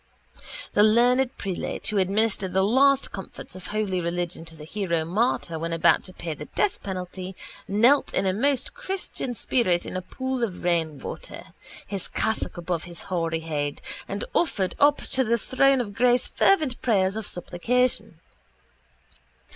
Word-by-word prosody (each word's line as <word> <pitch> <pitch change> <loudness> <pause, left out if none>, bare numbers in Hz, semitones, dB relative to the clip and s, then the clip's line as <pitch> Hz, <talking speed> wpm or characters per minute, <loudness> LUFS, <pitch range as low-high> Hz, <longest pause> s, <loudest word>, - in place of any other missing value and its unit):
The - - +4
learned 245 +4 +4
prelate 190 -3 -4
who 210 -2 +1
administered 195 0 +1
the 190 0 +3
last 270 +6 +4
comforts 195 -1 -8
of 185 - -9
holy 205 -4 -1
religion 170 -1 -3
to 165 0 -11
the 150 - -11
hero 170 -2 -1
martyr 175 -3 0
when 165 +1 -2
about 165 0 +4
to 185 - -8
pay 165 -3 -5
the 150 0 -8
death 405 - -1
penalty 185 0 -5 0.3
knelt 235 +8 +4
in - - 0
a 190 - +2
most 275 - 0
christian 385 - -4
spirit 185 -8 +1
in - - -6
a 185 - -1
pool 260 +6 -3
of 195 -6 -3
rainwater, 165 -5 -3 0.3
his 195 -2 -4
cassock 220 -4 -1
above 175 -1 -2
his 175 -1 -9
hoary 165 -2 0
head, 145 -3 -3 0.3
and - - -3
offered 195 - +1
up 290 0 +5
to 260 - 0
the 235 0 +2
throne 270 +4 +3
of 210 -5 -3
grace 245 +2 +3
fervent 310 -11 +2
prayers 195 -4 +2
of 220 -2 -4
supplication. 245 +9 -1
195 Hz, 155 wpm, -25 LUFS, 175-245 Hz, 0.3 s, up